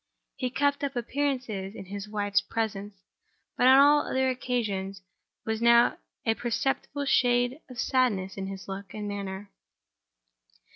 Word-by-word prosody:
He 255 - -2
kept 285 +2 0
up 280 -1 -2
appearances 240 -6 -2
in 195 - -8
his 200 +2 -7
wife's 205 -1 +1
presence—but 205 +2 -4
on 260 +1 +8
all 290 +1 +6
other 260 0 +1
occasions 205 -7 -3 0.4
there 220 - -1
was 220 - -5
now 235 0 +5 0.3
a 225 - +3
perceptible 270 +4 -2
shade 245 +1 +2
of 250 - -10
sadness 215 -9 +1
in 195 -1 -4
his 195 0 -8
look 195 0 -7
and 210 -1 -4
manner. 200 0 -5
225 Hz, 140 wpm, -28 LUFS, 200-255 Hz, 0.4 s, on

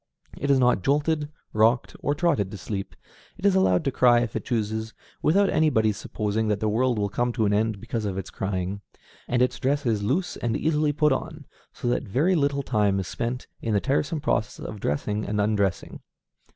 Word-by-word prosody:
It 140 - -3
is 140 - +5
not 125 -6 +3
jolted, 150 - +1 0.2
rocked, 115 +3 +2
or 145 - 0
trotted 145 - +1
to 105 - -7
sleep; 95 +1 -5 0.4
it 195 - -6
is 200 - +5
allowed 140 - +3
to 135 - +1
cry 120 -2 +5
if 115 -3 -3
it - - -2
chooses, 110 -1 -2 0.3
without 195 +6 +4
anybody's 110 - +2
supposing 110 +1 -2
that 105 -1 0
the 110 - 0
world 120 +3 +1
will 100 -1 +1
come 120 +5 -1
to 115 -2 +1
an 100 - +2
end 110 0 +1
because 115 0 -4
of 95 -2 -3
its 95 - -5
crying; 95 +1 -3 0.5
and 125 0 +2
its 125 - -1
dress 140 +1 0
is 110 -4 +1
loose 150 - -1
and 115 -2 -1
easily 150 -1 +1
put 150 +1 +2
on, 150 +3 -3 0.3
so 120 - -5
that 120 - +1
very 145 - +2
little 140 -4 +1
time 105 -6 +1
is 95 - -4
spent 120 +2 -3 0.2
in 110 -2 -1
the - - +4
tiresome 145 - -1
process 130 -6 -1
of 105 - -6
dressing 105 +8 -1
and 105 0 -2
undressing. 100 -2 0
120 Hz, 205 wpm, -25 LUFS, 105-145 Hz, 0.5 s, is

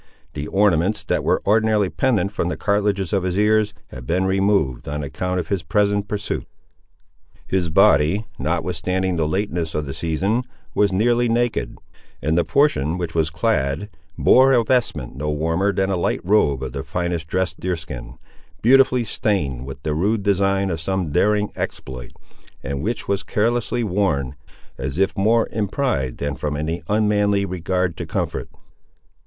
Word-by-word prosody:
The 70 +1 -4
ornaments 95 0 +2
that - - -1
were - - +1
ordinarily 105 -1 +2
pendant 115 -7 +1
from 90 -4 -1
the - - -3
cartilages 100 -3 0
of 100 - +2
his 90 0 -2
ears 105 0 +2
had - - -10
been 90 +3 +1
removed, 95 -9 +1
on 75 +1 -3
account 90 +7 -2
of 85 - -5
his 100 -3 0
present 100 +5 +1
pursuit. 100 0 -3 1.0
His 90 -3 0
body, 80 +6 +4
notwithstanding 95 0 -1
the 80 -2 +1
lateness 90 -2 -2
of 75 -1 -1
the 70 - -5
season, 95 +9 0 0.3
was 100 -1 +2
nearly 120 +5 +2
naked, 120 0 0 0.4
and 80 +4 0
the 85 - +3
portion 85 - +2
which 85 -3 -4
was 80 -1 +1
clad 85 -1 -1 0.3
bore 135 +1 +5
a 120 -2 +4
vestment 125 - 0
no 75 +2 -2
warmer 80 +6 +1
than 95 0 0
a 95 - 0
light 85 - 0
robe 85 - +2
of 65 - -4
the - - -4
finest 85 -2 -3
dressed 95 +2 -1
deer 90 -1 -1
skin, 65 -7 -8 0.5
beautifully 130 0 +5
stained 75 - -1
with 70 +1 -9
the 75 - -1
rude 100 +7 0
design 100 -1 +1
of 80 -1 -3
some 95 -2 -2
daring 105 +5 +2
exploit, 65 -2 -5 0.5
and 70 0 -3
which 110 +6 -3
was 100 -1 0
carelessly 120 +2 0
worn, 90 - 0 0.5
as 65 +3 -3
if 95 +1 +1
more 110 +4 +3
in 105 -2 -1
pride 80 - -1
than 70 0 -2
from 75 +2 -3
any 80 +3 -3
unmanly 105 -1 +2
regard 90 -1 -1
to - - -6
comfort. - - -3
95 Hz, 165 wpm, -21 LUFS, 80-105 Hz, 1.0 s, bore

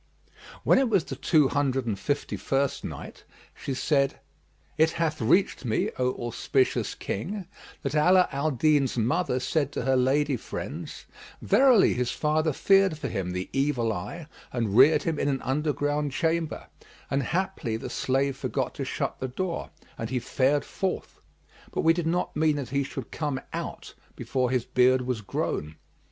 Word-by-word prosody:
When - - +5
it 265 -3 +2
was 195 -6 +3
the 135 - -6
Two 145 +2 +3
Hundred 135 -3 0
and 105 -4 -2
Fifty 145 +6 -2
first 135 0 -1
Night, - - -8 0.3
She 135 - -5
said, 140 +1 +1 0.6
It 160 +1 +4
hath 155 -3 -1
reached 160 - +2
me, 110 -4 0
O 125 0 +2
auspicious 130 +2 0
King, 185 - -4 0.4
that 140 -1 -2
Ala 180 +4 +5
al 140 +2 0
Din's 140 -1 +2
mother 125 +4 +1
said 145 +2 0
to - - -2
her 135 +1 +2
lady 135 +2 +2
friends, - - -7 0.3
"Verily 255 -6 +5
his 125 0 -1
father 155 +3 +1
feared 195 +2 +3
for 140 -3 -4
him 95 -4 -3
the 90 +1 -3
evil 135 -5 +1
eye 105 - -6 0.3
and 115 -5 -1
reared 135 +6 +6
him 160 -3 -1
in - - 0
an 135 -2 0
underground 145 0 -1
chamber; 165 0 -1 0.5
and 140 - +2
haply 170 -7 -2
the - - -6
slave 135 +1 0
forgot 140 - -2
to - - -4
shut - - -3
the 130 - -2
door 170 +7 -3 0.3
and 115 - -3
he 130 - -1
fared 130 +4 +1
forth; 190 -1 -4 0.5
but - - -1
we 165 - +5
did 170 -1 -2
not 175 +2 -1
mean 155 -1 +2
that 140 -3 -4
he 140 0 0
should 135 - -7
come 145 -4 -2
out, - - -6 0.2
before 130 -2 -1
his 125 -2 0
beard 125 0 +3
was 125 -3 -2
grown." 75 -5 -3
140 Hz, 170 wpm, -27 LUFS, 125-155 Hz, 0.6 s, reared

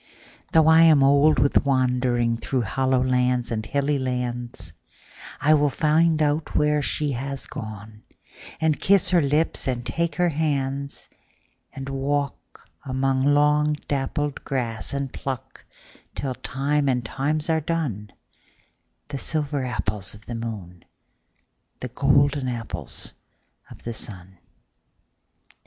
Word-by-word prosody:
Though 160 -1 +5
I 160 0 +7
am 155 -4 +6
old 145 +3 +5
with 140 +3 +3
wanderingThrough 125 -2 +1
hollow 130 +4 +1
lands 125 -1 +1
and 110 -1 -2
hilly 140 +4 0
lands,I 125 - -4
will 145 -1 +4
find 155 +2 +2
out 150 +1 -1
where 150 0 +3
she 145 +1 -1
has 135 +2 -4
gone, 110 0 -8 0.6
And 160 -1 +1
kiss 195 -2 +4
her 175 -2 +5
lips 150 +2 0
and 120 -2 -2
take 170 +7 -1
her 180 -1 +2
hands; 140 -3 -2 0.6
And 135 0 -7
walk 140 +1 -3 0.2
among 130 0 0
long 150 +1 +3
dappled 145 +1 -2
grass, 120 -5 -3
And 140 -2 -3
pluck 130 -3 -6 0.5
till 135 -2 -2
time 140 +3 -1
and 125 -2 0
times 150 +5 -1
are 160 -1 +1
done, 140 - -3 1.0
The 140 -2 -4
silver 145 -3 -2
apples 105 -6 -2
of 105 - -16
the 120 - -6
moon, 105 -7 -6 1.0
The 125 - -5
golden 140 +1 +2
apples 120 -3 -6 0.6
of - - -14
the 120 - -4
sun. 95 -4 -9
135 Hz, 120 wpm, -24 LUFS, 120-150 Hz, 1.0 s, I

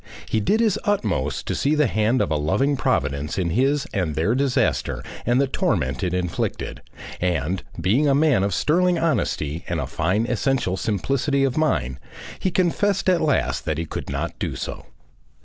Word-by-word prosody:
He 110 - +1
did 210 - +2
his 215 -2 +2
utmost 100 - -1
to - - -2
see 145 +2 +1
the 150 -1 +3
hand 110 +2 +2
of - - -3
a - - +2
loving 95 - +1
Providence 70 - -1
in 90 -3 0
his 135 - +2
and 85 -6 -1
their 85 +9 +1
disaster 130 -2 0 0.2
and 120 +1 +3
the 140 - +4
torment 65 - -1
it 90 - 0
inflicted, 90 -1 -2 0.4
and 90 +1 0 0.2
being 125 +11 +2
a 135 - +4
man 145 -7 +3
of 100 +1 0
sterling 175 - +2
honesty 85 - -1
and 85 -1 -1
a 70 - -2
fine 95 - 0
essential 125 -5 0
simplicity 135 - 0
of 135 -2 +1
mind, 70 - 0 0.4
he 190 - 0
confessed 190 +2 +1
at 180 -2 +3
last 150 -3 0
that 75 - -1
he 85 - -2
could - - -6
not - - -3
do - - -2
so. - - -6
115 Hz, 180 wpm, -23 LUFS, -, 0.4 s, the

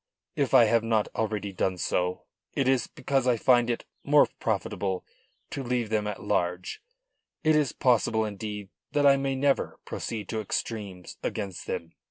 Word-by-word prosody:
If - - +2
I - - +9
have 115 -1 +3
not 110 -2 +1
already 105 -2 -2
done 95 0 0
so 90 +1 -1 0.3
it 135 - +1
is 130 -3 +3
because 135 -1 -1
I 120 -2 +4
find 120 0 +4
it 120 - -2 0.2
more - - +6
profitable 95 -1 -1 0.5
to 140 - -3
leave 120 -3 -1
them 105 -1 +1
at 105 - -5
large; 90 +1 -1 0.6
it 155 -1 +4
is 150 -3 +3
possible, 115 -3 +2
indeed, 105 -1 -5 0.2
that 145 -1 +3
I 140 -1 +8
may 135 0 -1
never 135 +1 +1
proceed 110 -3 -4
to 110 -1 -1
extremes 100 -3 -4
against 100 -4 -4
them. 85 0 -4
110 Hz, 165 wpm, -28 LUFS, 100-125 Hz, 0.6 s, I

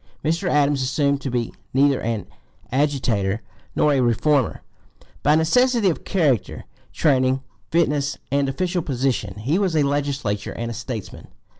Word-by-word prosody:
Mr. 165 +4 0
Adams 145 -1 +2
assumed 140 +1 +1
to 135 - -3
be 120 -2 -2 0.2
neither 140 0 +3
an 115 -2 -2 0.5
agitator 120 -7 0 0.3
nor 150 - +3
a 135 - +2
reformer; 125 +1 +1 0.6
by 150 +2 +4
necessity 220 +6 +3
of - - -7
character, 145 - 0 0.3
training, 130 -3 +2 0.3
fitness, 150 -4 +1
and 140 0 +1
official 175 +5 -1
position, 130 -8 -1
he 145 - +1
was 190 -5 0
a 150 - +4
legislator 140 -8 -1
and 115 0 -4
statesman. 110 -1 -7
140 Hz, 135 wpm, -22 LUFS, 125-150 Hz, 0.6 s, by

